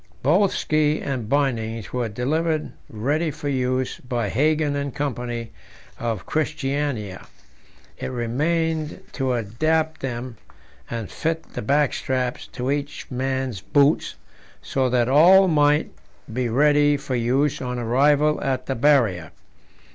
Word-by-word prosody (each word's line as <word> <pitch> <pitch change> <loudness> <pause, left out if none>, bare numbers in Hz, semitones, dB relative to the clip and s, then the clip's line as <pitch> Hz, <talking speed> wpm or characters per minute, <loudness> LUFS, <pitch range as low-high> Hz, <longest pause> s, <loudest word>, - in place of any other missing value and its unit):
Both 180 +8 +4
ski 155 0 +1
and 130 -6 -4
bindings 115 -6 -1
were 125 -2 -1
delivered 155 +8 -1 0.2
ready 145 +10 -1
for 145 -1 -5
use 130 -1 -1
by 120 -4 -2
Hagen 150 +4 +1
and 140 -2 -3
Co., 145 -2 -1 0.9
of 115 -7 -3
Christiania; 140 -9 -2 0.7
it - - -3
remained 155 +6 -1
to 130 -2 -1
adapt 155 +8 0
them, 125 -2 -5 0.5
and 115 -4 -5
fit 165 0 -3
the - - -4
backstraps 130 -1 0
to 130 +1 -2
each 145 -1 -4
man's 130 -4 -2
boots, 145 +5 +2 0.5
so 130 -1 0
that 120 -1 +2
all 180 +8 +7
might 150 -2 +3 0.4
be 125 0 -1
ready 145 +3 +4
for 140 -1 -5
use 130 +5 +1
on 125 -1 -3
arrival 145 +6 +2
at 130 -2 -1
the 135 - -1
Barrier. 115 - +2
135 Hz, 125 wpm, -23 LUFS, 120-150 Hz, 0.9 s, all